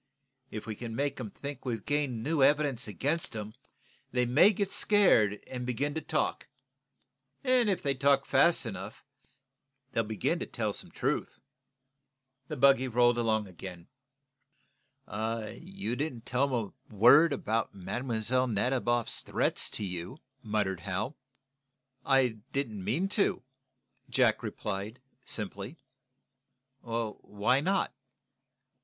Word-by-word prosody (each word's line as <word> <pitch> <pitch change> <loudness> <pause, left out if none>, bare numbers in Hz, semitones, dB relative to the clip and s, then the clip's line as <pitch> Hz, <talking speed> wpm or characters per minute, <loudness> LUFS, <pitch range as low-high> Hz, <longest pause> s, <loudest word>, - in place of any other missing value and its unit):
If 110 - -6
we 110 - -4
can 115 +1 -6
make 140 +1 -1
'em 110 -4 -5
think 140 +4 -7
we've 115 -5 -3
gained 140 -6 -1
new 150 +2 0
evidence 140 -3 +3
against 135 - -1
'em, 105 0 -5 0.6
they 125 -1 +1
may 145 - +6
get 200 -1 -2
scared 115 - +4
and 125 -1 -6
begin 130 +4 -1
to 160 - -3
talk. 155 -1 -1 1.0
If 245 -7 +3
they 140 -1 +2
talk 135 +1 +3
fast 170 -5 +4
enough, 100 -1 -7 0.9
they'll 115 - +1
begin 105 -3 -1
to - - -4
tell - - -2
some - - -6
truth." - - -2 1.1
The 155 - -5
buggy 135 0 +5
rolled 120 0 +3
along 110 -2 +1
again. 90 -2 -10 1.2
"You 115 - -4
didn't 130 -5 -4
tell 125 +3 +1
them 115 -7 -2 0.2
a 110 - -14
word 140 +10 +7
about 115 -5 -1
Mlle. 115 +5 -1
Nadiboff's 120 +1 +1
threats - - 0
to 105 - -2
you," 90 - -5 0.2
muttered 105 -5 -1
Hal. 100 - -3 0.9
"I 130 -5 +2
didn't 115 -9 -2
mean 135 - 0
to," 205 - +1 0.7
Jack 125 -3 +3
replied, 105 +1 -4 0.3
simply. 105 - -2 1.0
"Why 115 0 -1
not?" 190 -4 0
120 Hz, 125 wpm, -30 LUFS, 110-140 Hz, 1.2 s, word